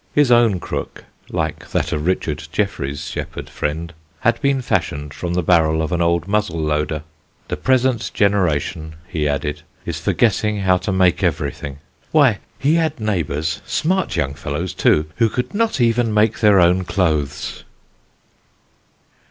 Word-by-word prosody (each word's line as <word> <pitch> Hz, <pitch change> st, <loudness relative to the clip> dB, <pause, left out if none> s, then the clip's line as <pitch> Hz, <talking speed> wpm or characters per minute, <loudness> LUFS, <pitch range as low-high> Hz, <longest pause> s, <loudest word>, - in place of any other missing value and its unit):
His 145 Hz, -4 st, +4 dB
own 115 Hz, -6 st, +5 dB
crook -, -, -5 dB, 0.3 s
(like -, -, -3 dB
that -, -, -1 dB
of 75 Hz, +2 st, -2 dB
Richard 80 Hz, -4 st, -1 dB
Jefferies' 70 Hz, -9 st, -2 dB
shepherd -, -, -5 dB
friend) 80 Hz, +3 st, -3 dB, 0.3 s
had 115 Hz, 0 st, +2 dB
been 140 Hz, -2 st, +1 dB
fashioned 75 Hz, -9 st, -1 dB
from 85 Hz, -1 st, -3 dB
the 90 Hz, -, +1 dB
barrel 80 Hz, -2 st, +3 dB
of 80 Hz, +1 st, -1 dB
an 85 Hz, -1 st, 0 dB
old 85 Hz, 0 st, +1 dB
muzzle 105 Hz, -5 st, 0 dB
loader. 75 Hz, 0 st, -1 dB, 0.5 s
The -, -, -2 dB
present 130 Hz, -3 st, +1 dB
generation, 85 Hz, -5 st, 0 dB
he 75 Hz, -4 st, -1 dB
added, 75 Hz, +1 st, -2 dB, 0.2 s
is -, -, -3 dB
forgetting 105 Hz, -2 st, +1 dB
how 95 Hz, -1 st, +4 dB
to 95 Hz, -, -3 dB
make 95 Hz, -2 st, +3 dB
everything: 70 Hz, -1 st, -2 dB, 0.3 s
why, -, -, +4 dB, 0.2 s
he 145 Hz, +3 st, +2 dB
had 160 Hz, -5 st, +1 dB
neighbours, 80 Hz, -8 st, -1 dB
smart 185 Hz, -, 0 dB
young 70 Hz, -5 st, 0 dB
fellows, 75 Hz, +4 st, -4 dB
too, 75 Hz, -, +3 dB
who 115 Hz, -2 st, +3 dB
could 125 Hz, +3 st, -3 dB
not 225 Hz, -5 st, 0 dB
even 115 Hz, -1 st, +2 dB
make 105 Hz, +1 st, +2 dB
their 105 Hz, -3 st, +5 dB
own 90 Hz, +1 st, +4 dB
clothes. 80 Hz, -7 st, -1 dB
90 Hz, 150 wpm, -20 LUFS, 75-110 Hz, 0.5 s, own